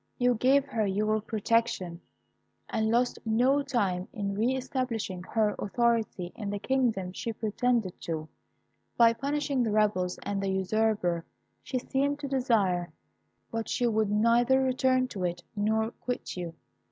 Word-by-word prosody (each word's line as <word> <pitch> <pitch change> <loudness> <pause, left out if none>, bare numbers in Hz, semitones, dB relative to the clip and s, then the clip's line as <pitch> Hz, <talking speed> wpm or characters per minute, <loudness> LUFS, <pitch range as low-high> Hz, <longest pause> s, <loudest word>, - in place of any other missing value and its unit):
You 245 0 +3
gave 265 +4 +3
her 230 -6 -1
your 215 +2 +1
protection, 215 -5 0 0.7
and 220 0 0
lost 240 +2 +1
no 250 +6 +3
time 200 -10 -1
in 200 -1 -3
re 230 +6 +1
establishing 245 -8 -3
her 210 +3 +1
authority 225 -5 0
in 210 -3 -4
the 205 - -2
kingdom 225 -6 0
she 230 - -3
pretended 220 -2 -1
to, 160 -2 -4 0.7
by 230 -1 +6
punishing 280 +2 -1
the 230 - +1
rebels 205 -4 +1
and 200 -1 -2
the 195 - -1
usurper 190 -2 +1 0.4
she 260 - -3
seemed 275 +3 0
to 285 - -3
desire; 215 -10 +1 0.6
but 225 0 -3
she 245 - 0
would 220 -3 +2
neither 235 +5 +4
return 255 0 +2
to 190 -6 -5
it 175 0 -2
nor 220 +2 +1
quit 250 0 -5
you. 175 -2 -5
220 Hz, 145 wpm, -29 LUFS, 195-250 Hz, 0.7 s, by